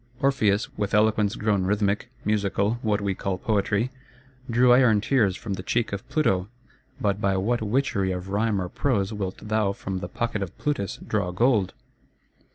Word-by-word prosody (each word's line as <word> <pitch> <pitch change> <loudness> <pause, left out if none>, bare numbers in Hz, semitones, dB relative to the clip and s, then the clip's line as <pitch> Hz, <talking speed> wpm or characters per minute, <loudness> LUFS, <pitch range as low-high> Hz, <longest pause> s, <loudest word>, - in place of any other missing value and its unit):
Orpheus, 110 -7 +2
with 100 0 0
eloquence 105 -1 +3
grown 105 -3 +1
rhythmic, 100 +1 0 0.2
musical 105 +1 0
(what 105 -3 0
we 100 -1 0
call 95 0 -3
Poetry), 105 +4 0 0.6
drew 120 +1 +5
iron 125 -4 +5
tears 105 -4 +2
from 105 - -5
the 95 - -4
cheek 115 +2 -1
of 100 - -6
Pluto: 95 -12 +1 0.5
but 100 -4 0
by 95 -1 +2
what 115 +5 0
witchery 105 -4 0
of 90 +1 -5
rhyme 105 +1 +1
or 90 - -2
prose 105 -1 0
wilt 95 -3 -4
thou 105 -2 0
from 95 -1 -4
the 90 -1 -6
pocket 115 0 -2
of 95 -4 -5
Plutus 145 -10 -2
draw 100 -4 -1
gold? 105 +1 +2
105 Hz, 165 wpm, -25 LUFS, 95-115 Hz, 0.6 s, drew